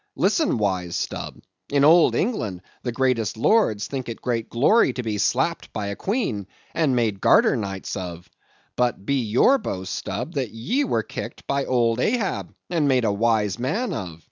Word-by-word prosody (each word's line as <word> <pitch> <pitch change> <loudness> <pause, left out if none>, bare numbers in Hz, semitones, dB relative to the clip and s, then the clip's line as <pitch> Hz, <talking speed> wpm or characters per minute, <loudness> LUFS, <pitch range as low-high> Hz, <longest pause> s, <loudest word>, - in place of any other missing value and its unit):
Listen, 315 - +2
wise 95 -5 -1
Stubb. - - -4 0.3
In 140 -1 +2
old 165 +3 +6
England 110 - -2 0.2
the 120 - -3
greatest 120 -4 0
lords 110 - +2
think 130 -3 -5
it 115 - -6
great 115 -3 -2
glory 145 - +4
to 125 - -4
be 105 -2 -2
slapped - - 0
by 105 - -3
a 100 - -4
queen, 155 - -2 0.3
and 150 -6 +2
made 110 -5 0
garter - - +5
knights 95 -2 -4
of; 90 -2 -6 0.5
but, 120 -5 0
be 140 +2 +1
your 125 - +3
boast, 95 - -4
Stubb, 130 +8 -4
that 130 -5 -2
ye 130 - -1
were - - 0
kicked - - -7
by 140 0 0
old 120 -2 +1
Ahab, 220 - -1 0.2
and 160 -4 +2
made 130 -3 +3
a 105 - +2
wise 105 -2 +1
man 195 - -1
of. 85 - -6
120 Hz, 175 wpm, -23 LUFS, 105-140 Hz, 0.5 s, old